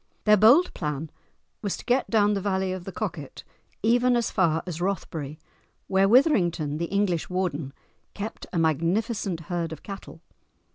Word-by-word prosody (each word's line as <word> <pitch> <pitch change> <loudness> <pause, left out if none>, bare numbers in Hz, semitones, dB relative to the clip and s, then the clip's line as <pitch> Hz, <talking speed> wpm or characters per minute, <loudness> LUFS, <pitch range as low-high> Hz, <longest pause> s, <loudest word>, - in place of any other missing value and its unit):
Their 210 -1 +6
bold 240 - +5
plan 150 +1 -4 0.5
was 200 -3 -2
to - - -11
get 250 +2 +1
down 210 -2 +3
the 200 - -1
valley 190 -1 0
of 185 -1 -7
the 195 - -5
Coquet 165 -9 -5 0.4
even 245 +2 +3
as 235 -1 0
far 165 -5 +1
as 175 -2 -5
Rothbury 160 -6 -3 0.5
where 195 0 +3
Withrington, 175 - +3
the 170 - 0
English 190 -3 0
warden, 170 -7 -2 0.4
kept 210 +2 -6
a 180 - -3
magnificent 170 - 0
herd 170 0 -3
of 160 - -8
cattle. 195 -1 -9
190 Hz, 155 wpm, -26 LUFS, 165-210 Hz, 0.5 s, Their